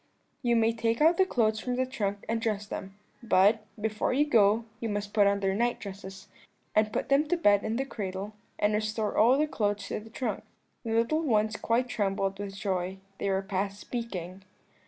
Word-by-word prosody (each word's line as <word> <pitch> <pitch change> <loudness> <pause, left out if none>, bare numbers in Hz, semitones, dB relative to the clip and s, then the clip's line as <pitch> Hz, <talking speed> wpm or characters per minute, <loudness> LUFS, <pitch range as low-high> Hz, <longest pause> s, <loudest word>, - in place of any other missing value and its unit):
"'You 240 -3 +2
may 225 0 +3
take 230 0 0
out 325 +3 +5
the 380 - +4
clothes 220 -7 +1
from 250 +2 -2
the 260 +1 +1
trunk 205 -6 -3
and 225 0 -1
dress 210 -2 -1
them; 195 -1 -7 0.3
but, 215 -1 +4 0.2
before 215 0 -1
you 290 +3 +3
go, 225 -4 +4
you 230 - -3
must 205 0 -3
put 205 -2 +5
on 200 0 +1
their 195 -1 +1
night 240 +4 0
dresses, 195 -1 -9 0.5
and 215 0 +3
put - - -2
them 280 +2 +3
to 355 - +1
bed 205 -11 +4
in 220 +1 -1
the 270 +3 -1
cradle, 200 -4 -5 0.2
and 210 +1 +2
restore 215 0 -1
all 235 +4 +6
the 300 - +3
other - - 0
clothes 205 -2 -1
to - - -2
the 220 +1 -12
trunk.' 250 +2 -3 0.4
The 225 -2 -2
little 230 +8 +2
ones 220 -7 +1
quite 235 +3 0
trembled 195 -3 -1
with 200 -1 -5
joy; 190 -2 -2 0.2
they 200 - -1
were 190 0 0
past 195 +1 -2
speaking. 195 -7 -5
215 Hz, 205 wpm, -29 LUFS, 200-230 Hz, 0.5 s, all